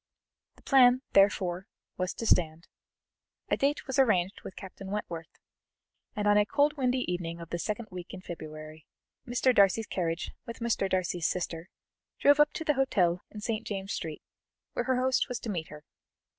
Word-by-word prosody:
The -, -, -22 dB
plan, 255 Hz, -1 st, +5 dB
therefore, 190 Hz, -2 st, +3 dB, 0.3 s
was 185 Hz, 0 st, -2 dB
to 230 Hz, -, -5 dB
stand. 165 Hz, -4 st, +1 dB, 0.8 s
A -, -, +3 dB
date 285 Hz, +2 st, 0 dB
was 265 Hz, 0 st, -1 dB
arranged 195 Hz, -7 st, +2 dB
with 190 Hz, -, -9 dB
Captain 190 Hz, 0 st, -9 dB
Wentworth, 170 Hz, -6 st, -4 dB, 0.9 s
and 210 Hz, 0 st, -1 dB
on 205 Hz, 0 st, +6 dB
a 210 Hz, -, +3 dB
cold 290 Hz, +4 st, +2 dB
windy 255 Hz, -2 st, +1 dB
evening 175 Hz, -4 st, -3 dB
of 170 Hz, -1 st, -10 dB
the 170 Hz, -, -2 dB
second 215 Hz, +4 st, -3 dB
week 180 Hz, -1 st, -8 dB
in 190 Hz, -, -8 dB
February, 155 Hz, -3 st, -9 dB, 0.4 s
Mr. 245 Hz, +1 st, +2 dB
Darcy's 200 Hz, +1 st, +4 dB
carriage 170 Hz, -3 st, -2 dB, 0.2 s
with 235 Hz, -, -6 dB
Mr. 230 Hz, -4 st, 0 dB
Darcy's 180 Hz, -3 st, 0 dB
sister, 170 Hz, -1 st, -3 dB, 0.5 s
drove 285 Hz, +1 st, +5 dB
up 295 Hz, 0 st, +5 dB
to 340 Hz, -, -4 dB
the 300 Hz, -, +2 dB
hotel 185 Hz, -11 st, +2 dB
in 210 Hz, -, -9 dB
St. 215 Hz, 0 st, -2 dB
James's 195 Hz, -1 st, -3 dB
Street 155 Hz, -2 st, -6 dB, 0.5 s
where -, -, -1 dB
her 260 Hz, -1 st, +1 dB
host 260 Hz, 0 st, +1 dB
was 250 Hz, -, -2 dB
to 225 Hz, -, -3 dB
meet 165 Hz, -5 st, -3 dB
her. 150 Hz, 0 st, -11 dB
195 Hz, 175 wpm, -29 LUFS, 175-245 Hz, 0.9 s, on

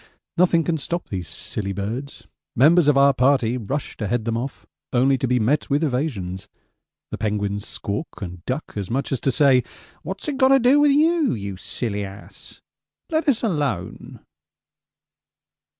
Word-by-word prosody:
Nothing 170 Hz, -1 st, +3 dB
can 160 Hz, -1 st, -1 dB
stop 175 Hz, +4 st, -4 dB
these 90 Hz, -4 st, -4 dB
silly 100 Hz, +4 st, -4 dB
birds. 115 Hz, +8 st, -5 dB, 0.3 s
Members 155 Hz, +5 st, +5 dB
of 145 Hz, -2 st, +4 dB
our 140 Hz, 0 st, +6 dB
party 130 Hz, -3 st, +2 dB
rush 130 Hz, +4 st, -4 dB
to 105 Hz, -, -3 dB
head 120 Hz, -1 st, -1 dB
them 115 Hz, -1 st, -1 dB
off, 130 Hz, +4 st, -5 dB, 0.3 s
only 130 Hz, +2 st, +3 dB
to 130 Hz, -, 0 dB
be 125 Hz, 0 st, +2 dB
met 130 Hz, +7 st, +1 dB
with 145 Hz, +3 st, +1 dB
evasions 125 Hz, -, -2 dB, 0.6 s
the -, -, -5 dB
penguins 100 Hz, -1 st, -2 dB
squawk 100 Hz, +11 st, -5 dB
and 90 Hz, -3 st, -7 dB
duck 130 Hz, +5 st, -4 dB
as 100 Hz, -3 st, -4 dB
much 135 Hz, +4 st, -2 dB
as 135 Hz, -, -1 dB
to 135 Hz, -, +1 dB
say, 130 Hz, -2 st, +4 dB, 0.4 s
'What's -, -, -6 dB
it 290 Hz, -3 st, -2 dB
got 260 Hz, -1 st, +5 dB
to 270 Hz, 0 st, +5 dB
do 255 Hz, +4 st, +5 dB
with 290 Hz, -1 st, +5 dB
you, 315 Hz, -, +3 dB
you 100 Hz, -2 st, -5 dB
silly 105 Hz, +2 st, -3 dB
ass? 100 Hz, +1 st, -11 dB, 0.5 s
Let 315 Hz, -1 st, +1 dB
us 250 Hz, -4 st, +1 dB
alone.' 145 Hz, -, -3 dB
130 Hz, 165 wpm, -22 LUFS, 105-160 Hz, 0.6 s, our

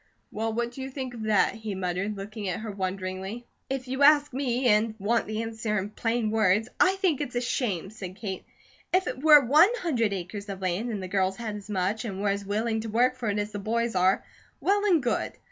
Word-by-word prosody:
"Well, 225 Hz, +1 st, -2 dB
what 235 Hz, +1 st, -2 dB
do 265 Hz, -, -8 dB
you 265 Hz, -, -4 dB
think 260 Hz, -2 st, -5 dB
of 230 Hz, -, -8 dB
that?" 215 Hz, -2 st, +3 dB
he 220 Hz, -3 st, -5 dB
muttered, 185 Hz, +3 st, -2 dB
looking 205 Hz, +1 st, -6 dB
at 180 Hz, -, -3 dB
her 220 Hz, -1 st, -5 dB
wonderingly. 190 Hz, +3 st, -4 dB, 0.2 s
"If 265 Hz, -1 st, -3 dB
you 265 Hz, +2 st, -3 dB
ask 290 Hz, -1 st, +6 dB
me, 255 Hz, -1 st, -1 dB
and 215 Hz, 0 st, +3 dB
want 225 Hz, +3 st, 0 dB
the 215 Hz, +1 st, -2 dB
answer 220 Hz, -1 st, -2 dB
in 200 Hz, +1 st, -3 dB
plain 225 Hz, 0 st, -1 dB
words, 215 Hz, 0 st, +3 dB
I 380 Hz, +1 st, +5 dB
think 370 Hz, -7 st, +1 dB
it's 250 Hz, -4 st, -4 dB
a -, -, +2 dB
shame!" 210 Hz, -, -2 dB
said 190 Hz, -4 st, -8 dB
Kate. 190 Hz, -3 st, -5 dB, 0.5 s
"If 370 Hz, +1 st, +3 dB
it 260 Hz, -, -4 dB
were 300 Hz, -3 st, +8 dB
ONE 305 Hz, -, +6 dB
HUNDRED 240 Hz, -, +1 dB
acres 200 Hz, +2 st, -5 dB
of 195 Hz, -1 st, -5 dB
land, 190 Hz, +5 st, -1 dB
and 205 Hz, -4 st, -3 dB
the -, -, -4 dB
girls 190 Hz, 0 st, 0 dB
had 220 Hz, -3 st, -4 dB
as 205 Hz, 0 st, -9 dB
much, 200 Hz, +3 st, -1 dB
and 195 Hz, -5 st, -5 dB
were 205 Hz, 0 st, +1 dB
as 200 Hz, 0 st, -1 dB
willing 220 Hz, +3 st, -1 dB
to 225 Hz, -, -5 dB
work 245 Hz, +4 st, +3 dB
it 210 Hz, -3 st, 0 dB
as 210 Hz, 0 st, -2 dB
the 205 Hz, -, -5 dB
boys 230 Hz, +3 st, -1 dB
are, 185 Hz, +1 st, +2 dB, 0.3 s
well 405 Hz, +1 st, +2 dB
and 345 Hz, -9 st, +3 dB
good. 240 Hz, -, -1 dB
220 Hz, 230 wpm, -27 LUFS, 200-245 Hz, 0.5 s, were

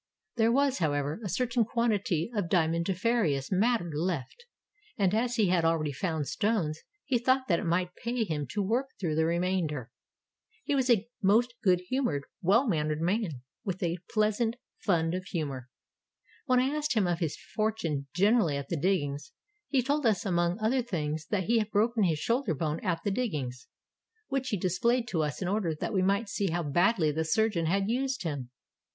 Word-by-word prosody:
There 225 Hz, -1 st, +3 dB
was, 275 Hz, +1 st, +2 dB
however, 145 Hz, +3 st, -1 dB
a 200 Hz, -, -3 dB
certain 240 Hz, +5 st, +1 dB
quantity 210 Hz, -6 st, 0 dB
of 200 Hz, -5 st, -1 dB
diamondiferous 170 Hz, -, +1 dB
matter 200 Hz, -2 st, +2 dB
left, 170 Hz, -, -3 dB, 0.5 s
and 195 Hz, -3 st, +2 dB
as 240 Hz, +3 st, +1 dB
he 215 Hz, -5 st, +3 dB
had 175 Hz, -2 st, +2 dB
already 165 Hz, -2 st, +1 dB
found 155 Hz, 0 st, -2 dB
stones 180 Hz, -8 st, 0 dB, 0.3 s
he 255 Hz, -4 st, +1 dB
thought 260 Hz, +2 st, +2 dB
that 170 Hz, -3 st, +2 dB
it -, -, -4 dB
might 180 Hz, +1 st, 0 dB
pay 235 Hz, +3 st, -2 dB
him 150 Hz, -8 st, -3 dB
to 205 Hz, -1 st, -2 dB
work 240 Hz, +7 st, 0 dB
through 170 Hz, -5 st, -1 dB
the 160 Hz, +1 st, +2 dB
remainder. 170 Hz, -7 st, -1 dB, 0.7 s
He -, -, -1 dB
was 265 Hz, -2 st, +1 dB
a 225 Hz, -2 st, +3 dB
most 225 Hz, +5 st, +3 dB
good 180 Hz, -4 st, +3 dB
humored, 180 Hz, -, -1 dB, 0.2 s
well 205 Hz, +9 st, +4 dB
mannered 155 Hz, -5 st, 0 dB
man, 175 Hz, -, -1 dB, 0.2 s
with 190 Hz, -1 st, -3 dB
a 170 Hz, +1 st, -1 dB
pleasant 215 Hz, +1 st, +1 dB, 0.2 s
fund 165 Hz, -4 st, +1 dB
of 185 Hz, 0 st, -3 dB
humor. 140 Hz, -9 st, -4 dB, 0.8 s
When 255 Hz, -1 st, +4 dB
I 265 Hz, +4 st, +1 dB
asked 300 Hz, -3 st, -1 dB
him 210 Hz, -4 st, +3 dB
of 175 Hz, -1 st, 0 dB
his 160 Hz, -5 st, -2 dB
fortune 170 Hz, -11 st, -2 dB
generally 195 Hz, -5 st, +3 dB
at 140 Hz, -1 st, -6 dB
the 170 Hz, -, -1 dB
diggings, 150 Hz, -, -1 dB, 0.3 s
he 265 Hz, -3 st, +2 dB
told 285 Hz, 0 st, +1 dB
us 210 Hz, -5 st, +1 dB
among 175 Hz, -1 st, +1 dB
other 225 Hz, +4 st, +1 dB
things 160 Hz, -8 st, -3 dB
that 200 Hz, -3 st, 0 dB
he 230 Hz, +5 st, +2 dB
had 215 Hz, -1 st, -1 dB
broken 220 Hz, +1 st, +2 dB
his 160 Hz, -3 st, +1 dB
shoulder 230 Hz, -, 0 dB
bone 155 Hz, +1 st, -2 dB
at 175 Hz, -4 st, -1 dB
the 205 Hz, -, 0 dB
diggings, 150 Hz, -, -3 dB, 0.6 s
which 270 Hz, -1 st, -1 dB
he 210 Hz, -, 0 dB
displayed 235 Hz, +7 st, +1 dB
to 165 Hz, -, 0 dB
us 150 Hz, +4 st, -2 dB
in -, -, -2 dB
order 190 Hz, -5 st, 0 dB
that 155 Hz, -, -4 dB
we 190 Hz, -, +2 dB
might 200 Hz, +4 st, +1 dB
see 200 Hz, 0 st, -1 dB
how 170 Hz, +1 st, -1 dB
badly 175 Hz, +2 st, +2 dB
the 160 Hz, +2 st, -1 dB
surgeon 170 Hz, 0 st, +1 dB
had 195 Hz, +3 st, +1 dB
used 260 Hz, +2 st, -1 dB
him. 140 Hz, -7 st, -4 dB
190 Hz, 185 wpm, -29 LUFS, 160-230 Hz, 0.8 s, well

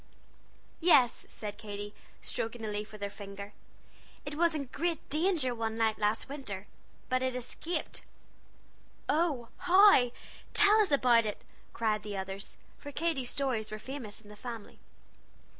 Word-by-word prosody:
"Yes," 285 Hz, -8 st, +5 dB
said 210 Hz, -1 st, -6 dB
Katy, 205 Hz, -1 st, -6 dB, 0.3 s
stroking 225 Hz, 0 st, -3 dB
a -, -, -2 dB
leaf 210 Hz, +1 st, -4 dB
with 210 Hz, -1 st, -8 dB
her 200 Hz, -, -1 dB
finger, 200 Hz, 0 st, -8 dB, 0.7 s
"it 290 Hz, -, -4 dB
was 335 Hz, +1 st, +3 dB
in 285 Hz, -2 st, -2 dB
great 335 Hz, 0 st, -1 dB
danger 310 Hz, -5 st, +2 dB
one 225 Hz, -1 st, -2 dB
night 220 Hz, -1 st, +2 dB
last 210 Hz, +1 st, +1 dB
winter, 210 Hz, -9 st, -6 dB, 0.4 s
but 255 Hz, 0 st, +1 dB
it 260 Hz, -1 st, 0 dB
escaped." 250 Hz, +7 st, -4 dB, 1.1 s
"Oh, 290 Hz, -6 st, +1 dB
how? 370 Hz, -9 st, +7 dB, 0.5 s
Tell 420 Hz, +1 st, +7 dB
us 415 Hz, -, +2 dB
about 240 Hz, -5 st, +5 dB
it!" 210 Hz, -, -5 dB, 0.3 s
cried 215 Hz, -2 st, 0 dB
the 210 Hz, -2 st, -5 dB
others, 195 Hz, +1 st, -5 dB, 0.2 s
for 290 Hz, -, -8 dB
Katy's 290 Hz, -5 st, 0 dB
stories 255 Hz, -6 st, -1 dB
were 215 Hz, -, -4 dB
famous 225 Hz, -3 st, -6 dB
in 210 Hz, -, -16 dB
the 210 Hz, -, -10 dB
family. 230 Hz, -1 st, -8 dB
240 Hz, 145 wpm, -31 LUFS, 210-290 Hz, 1.1 s, how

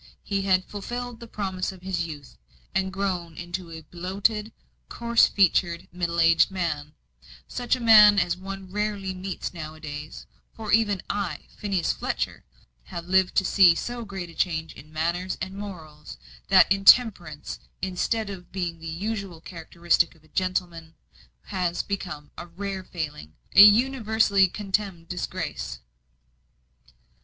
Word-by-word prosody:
He 200 Hz, -1 st, -1 dB
had 185 Hz, -1 st, +2 dB
fulfilled 240 Hz, +3 st, -6 dB
the 235 Hz, -, -10 dB
promise 190 Hz, -4 st, -3 dB
of 185 Hz, -1 st, -14 dB
his 180 Hz, -3 st, -2 dB
youth, 145 Hz, -3 st, -10 dB, 0.4 s
and 190 Hz, 0 st, 0 dB
grown 185 Hz, -4 st, -3 dB
into 175 Hz, 0 st, -6 dB
a 160 Hz, -1 st, -8 dB
bloated, 195 Hz, +6 st, -1 dB, 0.4 s
coarse 235 Hz, 0 st, +3 dB
featured, 175 Hz, -3 st, +2 dB
middle 170 Hz, -1 st, -2 dB
aged 165 Hz, 0 st, +5 dB
man; 160 Hz, -6 st, -3 dB, 0.5 s
such 245 Hz, 0 st, 0 dB
a -, -, -7 dB
man 210 Hz, -3 st, +8 dB
as 175 Hz, -2 st, +2 dB
one 190 Hz, 0 st, -8 dB
rarely 205 Hz, -2 st, -2 dB
meets 185 Hz, 0 st, -5 dB
with -, -, -27 dB
now 155 Hz, 0 st, -7 dB
a -, -, -15 dB
days; 150 Hz, 0 st, -8 dB, 0.3 s
for 220 Hz, -2 st, -5 dB
even 205 Hz, -4 st, +3 dB
I, 195 Hz, -7 st, -3 dB
Phineas 195 Hz, -5 st, -1 dB
Fletcher, -, -, -3 dB, 0.4 s
have 170 Hz, -, -7 dB
lived 190 Hz, 0 st, +3 dB
to 190 Hz, -, +3 dB
see 180 Hz, -3 st, +6 dB
so 240 Hz, +6 st, -4 dB
great 190 Hz, -5 st, -7 dB
a -, -, -15 dB
change 160 Hz, -2 st, -1 dB
in 150 Hz, +3 st, -14 dB
manners 170 Hz, +4 st, -2 dB
and 190 Hz, +1 st, -4 dB
morals, 160 Hz, -, -9 dB, 0.3 s
that -, -, +6 dB
intemperance, 195 Hz, -6 st, +4 dB, 0.2 s
instead 200 Hz, +3 st, -1 dB
of 180 Hz, -3 st, -10 dB
being 175 Hz, -3 st, -3 dB
the 165 Hz, -, -8 dB
usual 195 Hz, +1 st, -4 dB
characteristic 170 Hz, 0 st, 0 dB
of 160 Hz, -, -24 dB
"a 155 Hz, -, -23 dB
gentleman," 175 Hz, -3 st, -2 dB, 0.5 s
has 175 Hz, -2 st, -2 dB
become 175 Hz, -7 st, -5 dB
a 175 Hz, -, -7 dB
rare 190 Hz, +2 st, -5 dB
failing 150 Hz, -, -6 dB, 0.2 s
a 200 Hz, -, +9 dB
universally 220 Hz, -3 st, +5 dB
contemned 195 Hz, -3 st, -3 dB
disgrace. 175 Hz, -, -4 dB
185 Hz, 145 wpm, -25 LUFS, 170-200 Hz, 0.5 s, a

